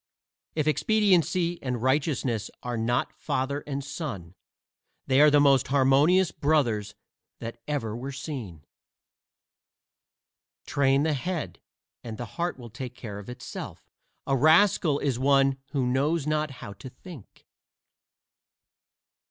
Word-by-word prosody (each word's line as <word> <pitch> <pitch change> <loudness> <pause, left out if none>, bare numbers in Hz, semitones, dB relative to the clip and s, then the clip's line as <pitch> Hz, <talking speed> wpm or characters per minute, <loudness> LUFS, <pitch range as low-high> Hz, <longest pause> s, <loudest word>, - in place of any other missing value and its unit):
If 155 -2 0
Expediency 180 -1 +2
and 125 -2 -2
Righteousness 130 -5 0
are 125 -1 -3
not 115 +2 0
father 135 +2 -2
and 140 -1 -3
son 130 - -6 0.7
they 135 +1 +4
are 150 - +8
the 145 0 +5
most 140 -2 +4
harmonious 140 +7 +4
brothers 125 -9 0 0.4
that 115 0 -8
ever 115 -8 -2
were 130 +4 -5
seen. 125 - -7 2.0
Train 135 +1 +2
the 160 -1 +1
head, 170 +4 -4 0.4
and 115 -2 -7
the 120 - -5
heart 175 -2 -2
will 120 -3 -11
take 125 +1 -7
care 105 -5 -7
of 105 - -10
itself; 125 0 -8 0.3
a 135 - +1
rascal 155 +1 +4
is 135 -4 -1
one 135 0 +3
who 135 -3 -1
knows 140 +5 +1
not 155 0 0 0.2
how 100 - -7
to 100 +7 -10
think. 135 - -14
135 Hz, 125 wpm, -27 LUFS, 120-150 Hz, 2.0 s, are